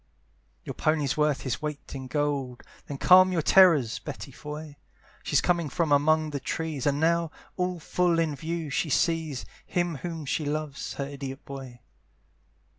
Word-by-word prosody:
Your - - -5
pony's 150 -3 +1
worth 150 -2 +1
his 130 +3 -3
weight 150 -1 -5
in 130 -1 -6
gold, 140 -3 -2 0.2
Then 140 - -5
calm 185 +4 +7
your 165 -4 0
terrors, 165 - +5
Betty - - -7
Foy! 150 0 -8 0.4
She's - - +2
coming 170 -4 +1
from 160 +2 -1
among 155 +2 +3
the 140 - -3
trees, 155 -1 -3
And 145 0 +1
now, 170 +1 +2 0.3
all 180 -1 -1
full 175 +1 +1
in 160 -3 +1
view, 160 +1 -4
she 155 - 0
sees 160 -2 0 0.2
Him 175 -3 -1
whom 165 0 -5
she 150 - -1
loves, 150 -1 -3
her 140 - -3
idiot 135 -1 -7
boy. 130 -3 -9
150 Hz, 160 wpm, -27 LUFS, 140-165 Hz, 0.4 s, calm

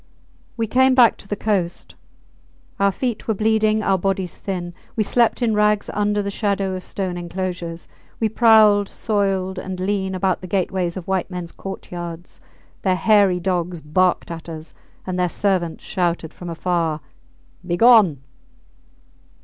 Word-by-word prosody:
We 230 - 0
came 260 +4 +3
back 240 -4 +6
to - - -15
the 205 - -2
coast. 195 -5 -2 0.9
Our 200 0 +3
feet 240 +2 -3
were 220 - +1
bleeding, 215 0 +2
our 195 -2 +2
bodies 190 -1 -1
thin. 175 -3 -4 0.2
We 220 - +2
slept 240 +3 +2
in 225 -2 +2
rags 210 0 +2
under 210 0 0
the 200 - -3
shadow 200 -2 -1
of 185 0 -5
stone 185 -2 -3
enclosures; 175 -1 -5 0.3
we 225 - +2
prowled, 215 -3 +5
soiled 195 -3 -1
and 185 -1 -6
lean, 190 0 -1
about 185 0 0
the 185 - -7
gateways 185 -1 -1
of 180 - -7
white 190 -2 -1
mens 180 -2 -6
courtyards. 175 -3 -8 0.4
Their 185 -2 +2
hairy 195 -1 +4
dogs 180 -1 -2
barked 170 +4 +1
at 165 0 -7
us, 160 -1 -8 0.3
and 185 -1 -3
their 180 -1 +2
servants 180 -4 -1
shouted 175 -4 -2
from 175 - -8
afar, 165 -2 -1 0.6
Begone! 180 - +5
190 Hz, 150 wpm, -21 LUFS, 175-210 Hz, 0.9 s, back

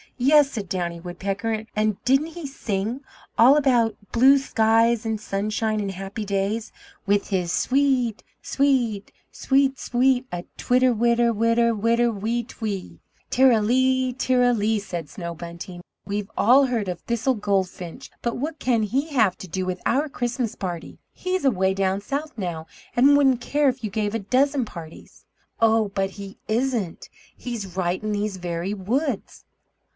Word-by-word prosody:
"Yes," 280 +2 +5
said 210 -5 -5
Downy 175 -2 -2
Woodpecker, 200 +5 -3
"and 215 -1 0
didn't 270 +4 +3
he 330 -1 -8
sing? 225 -1 -3 0.4
All 255 +5 +7
about 245 -6 +3 0.2
blue 265 +4 +6
skies, 230 -3 +2
and 220 -1 -1
sunshine 215 +2 -1
and 200 -2 -2
happy 195 +3 -6
days, 200 +3 -2 0.3
with 205 0 +1
his 180 -4 0
'Swee 270 +8 +2
e 260 -4 +2
et 220 - -13 0.2
sweet 250 -7 0 0.2
sweet 270 0 +1
sweet 255 +1 +2
a 175 0 -5
twitter 250 0 +3
witter 235 +1 +2
witter 230 +1 +2
witter 230 +2 +2
wee 225 +3 -2
twea!'" 210 -5 -6 0.3
"Ter 265 +1 +5
ra 225 - +4
lee, 260 +3 +2
ter 255 0 +1
ra 245 0 +4
lee," 220 -1 +1
said 175 -6 -6
Snow 170 -3 -6
Bunting. 170 +2 -8 0.2
"We've 205 0 -3
all 265 +5 +5
heard 230 -5 -1
of 180 -2 -3
Thistle 235 +3 0
Goldfinch, 195 +1 -3
but 235 - -1
what 300 +4 -4
can 235 -3 +1
he 265 +9 -1
have 220 - +2
to 190 - -8
do 185 +2 -3
with 185 0 -3
your 290 +5 +1
Christmas 245 -3 -2
party? 175 -4 -6
He's 370 -3 -2
away 190 -6 +2
down 195 0 0
South 290 +8 -4
now, 170 -5 -4 0.3
and 280 +4 +6
wouldn't 265 -4 +3
care 290 +2 +2
if 255 -1 -5
you 215 - -3
gave 215 0 -1
a - - 0
dozen 260 +5 +1
parties." 165 -6 -12 0.3
"Oh, 225 -2 +3
but 195 -1 -1
he 195 0 -10
isn't; 230 -5 -1 0.3
he's 210 -7 -6
right 185 -1 -1
in 215 0 -3
these 205 -1 -2
very 175 +2 -3
woods!" 230 +5 -3
225 Hz, 165 wpm, -24 LUFS, 195-255 Hz, 0.4 s, All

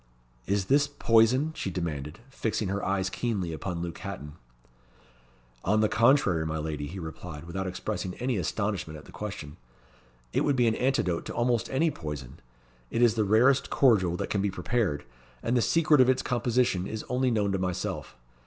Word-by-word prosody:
"Is 100 -1 +1
this 140 +6 +3
poison?" 130 +2 +3
she - - -3
demanded, 80 -1 -4
fixing 110 -6 -2
her 100 +1 -2
eyes 95 -1 0
keenly 95 -5 -2
upon 85 +1 -4
Luke 85 -2 -6
Hatton. 75 +1 -7 1.3
"On 105 +3 +2
the 110 - +4
contrary, 110 - +4
my 80 0 -2
lady," 75 -2 -3
he 90 +6 -7
replied, 80 -3 -7
without 95 +3 -4
expressing 90 0 -4
any 125 -2 -1
astonishment 95 -3 -2
at 75 - -13
the - - -14
question, 90 -8 -7 0.8
"it - - +2
would 145 - +2
be 125 -2 +3
an 115 - +3
antidote 115 -10 0
to - - -6
almost 120 -1 +1
any 155 +4 +2
poison. 75 - -7 0.5
It 115 - +1
is 120 -3 +5
the 110 -1 +1
rarest 120 +7 +4
cordial 95 -10 +3
that - - -4
can 100 - +1
be 100 - +1
prepared, 95 -7 -1 0.4
and 120 - +1
the 120 - +4
secret 155 0 +4
of 130 - +5
its 130 - +2
composition 120 -6 +1
is 110 0 -5
only 130 +1 +1
known 105 -4 +1
to 95 - 0
myself. 90 -1 -3
100 Hz, 180 wpm, -28 LUFS, 85-120 Hz, 1.3 s, is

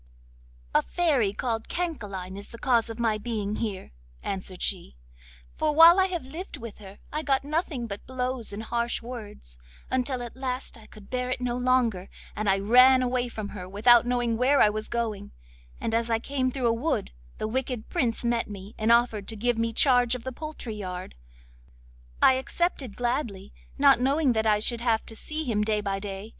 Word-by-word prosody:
'A - - +5
Fairy 285 - +1
called 225 +1 -3
Cancaline 205 - -4
is 200 +1 -8
the 235 - -10
cause 235 -2 +2
of 225 - -6
my 225 -3 +1
being 210 -2 -3
here,' 205 -4 -4 0.3
answered 190 -1 -4
she, 65 - -2 0.6
'for 305 -1 0
while 335 +3 +9
I 380 - +4
lived 340 0 -6
with 230 -2 -9
her 195 -1 -12 0.2
I 305 - -1
got 275 -3 +1
nothing 295 -4 -2
but 200 -3 -7
blows 255 -2 -2
and 205 +2 -6
harsh 235 +1 -2
words, 210 - -9 0.3
until 255 -1 0
at 240 - -8
last 260 0 -4
I 220 -2 -15
could 205 -2 -15
bear 250 0 -1
it 255 - -1
no 245 -1 -1
longer, 245 -6 +1 0.3
and 210 -1 -1 0.2
ran 255 +2 +7
away 250 0 0
from 215 -3 -6
her 185 -3 -8
without 235 +4 +5
knowing 240 -2 0
where 265 +4 +3
I 210 - +6
was 215 0 -4
going, 215 -4 -3 0.5
and 225 - -2
as 230 +1 +1
I 225 - +3
came 260 +2 -1
through 255 -1 -3
a 230 - +3
wood 255 - -1 0.3
the - - -2
wicked 250 -1 -3
Prince 245 -9 -1
met 235 -1 0
me, 200 +1 -9
and 220 +1 +2
offered 235 -4 +3
to 225 - -3
give 235 +2 0
me 230 0 0
charge 245 0 +3
of 245 - -7
the 260 - -4
poultry 300 -4 -6
yard. 185 -3 -6 1.1
I 265 - +8
accepted 275 - -2
gladly, 240 -6 -2 0.2
not 275 -3 +5
knowing 275 0 +3
that 220 -1 +1
I 210 -1 +4
should 230 +2 -1
have 230 -2 +1
to 225 - -7
see 310 +7 -4
him 225 -7 0
day 210 0 +1
by 195 -1 -2
day. 195 +1 -6
235 Hz, 190 wpm, -27 LUFS, 215-255 Hz, 1.1 s, while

